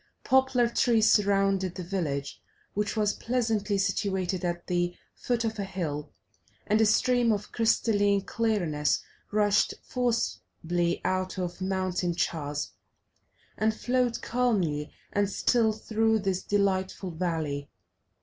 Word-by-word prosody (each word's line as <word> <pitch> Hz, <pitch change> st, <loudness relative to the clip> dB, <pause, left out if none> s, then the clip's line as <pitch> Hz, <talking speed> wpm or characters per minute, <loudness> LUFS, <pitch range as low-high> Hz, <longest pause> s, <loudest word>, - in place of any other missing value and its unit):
Poplar 265 Hz, -2 st, +3 dB
trees 230 Hz, -2 st, +3 dB
surrounded 195 Hz, -3 st, +2 dB
the 180 Hz, -, -5 dB
village, 155 Hz, -7 st, -3 dB, 0.3 s
which 210 Hz, +2 st, -2 dB
was 210 Hz, -1 st, +2 dB
pleasantly 225 Hz, -4 st, 0 dB
situated 190 Hz, -2 st, -1 dB
at 175 Hz, -1 st, -2 dB
the 175 Hz, 0 st, 0 dB, 0.2 s
foot 235 Hz, -2 st, -1 dB
of 220 Hz, -1 st, -3 dB
a -, -, 0 dB
hill, 160 Hz, -6 st, -4 dB, 0.5 s
and 215 Hz, +1 st, +3 dB
a 220 Hz, -, +5 dB
stream 245 Hz, +2 st, +3 dB
of 205 Hz, -1 st, -2 dB
crystalline 205 Hz, -3 st, +2 dB
clearness 190 Hz, -10 st, 0 dB, 0.3 s
rushed 205 Hz, -1 st, +2 dB
forcibly 175 Hz, -8 st, -1 dB
out 185 Hz, 0 st, -1 dB
of 180 Hz, 0 st, -4 dB
a -, -, -1 dB
mountain 185 Hz, -2 st, -1 dB
chasm, 150 Hz, -4 st, -2 dB, 0.8 s
and 220 Hz, 0 st, +1 dB
flowed 245 Hz, 0 st, 0 dB
calmly 190 Hz, -12 st, 0 dB, 0.2 s
and 205 Hz, -1 st, +2 dB
still 225 Hz, +2 st, +2 dB
through 220 Hz, +1 st, +1 dB
this 195 Hz, -3 st, -1 dB
delightful 190 Hz, -2 st, 0 dB
valley. 160 Hz, -4 st, -2 dB
200 Hz, 120 wpm, -28 LUFS, 175-220 Hz, 0.8 s, a